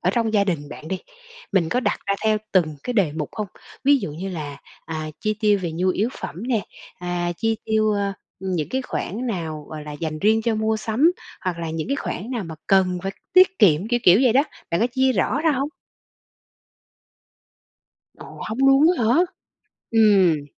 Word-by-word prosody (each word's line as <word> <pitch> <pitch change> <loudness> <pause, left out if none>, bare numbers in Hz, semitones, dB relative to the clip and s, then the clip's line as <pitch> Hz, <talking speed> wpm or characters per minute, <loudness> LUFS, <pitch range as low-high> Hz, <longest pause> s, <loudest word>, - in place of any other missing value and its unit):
ở 180 - +2
trong 225 0 0
gia 200 -1 +4
đình 160 -7 -2
bạn 155 - -9
đi, 190 - -2 0.5
mình 175 -5 +2
có 250 +8 +1
đặt - - 0
ra 200 - +2
theo 215 -1 +3
từng 160 -6 +2
cái 250 - -2
đề 190 -10 +2
mục 150 -2 -3
hông? 210 -2 -3 0.4
Ví 285 +1 +6
dụ 155 - -4
như 185 +5 -5
là, 150 -5 -6 0.3
à, 155 -1 -4
chi 215 0 0
tiêu 210 -2 +4
về 170 -3 -2
nhu 180 +3 0
yếu 210 +5 +1
phẩm 180 - -6
nè, 230 -5 +2 0.4
à, 175 -1 -2
chi 225 -1 0
tiêu, 215 -1 +2
ơ, 200 -1 0 0.3
những 180 -5 -2
cái 260 +1 -1
khoản 245 -1 -4
nào, 160 -8 -4
gọi 155 -1 -7
là, 150 - -7
dành 155 +1 -4
riêng 220 +5 +3
cho 230 -1 +1
mua 220 0 +1
sắm, 230 +10 +2 0.3
hoặc 180 -4 -3
là 165 -1 -3
những 160 +6 -4
cái 275 - 0
khoản 230 -4 -4
nào 230 -7 -2
mà 165 - -7
cần 185 -2 +3
phải 195 - -3 0.2
tiết 370 0 +6
kiệm, 185 +2 +4
kiểu, 240 -1 +1
kiểu, 180 0 +7
vậy 250 - +5
đó, 270 +4 +5 0.3
bạn 170 - +1
có 235 - +4
chia 260 +1 +2
rõ 250 +6 +1
ra 320 0 +3
hông? 275 +1 0 2.5
Ồ! - - -11
Hông 220 +3 -4
luôn 270 +3 +6
á 235 - +1
hả? 230 +3 +4 0.8
Ừm. 195 -9 +4
200 Hz, 205 wpm, -23 LUFS, 170-230 Hz, 2.5 s, kiểu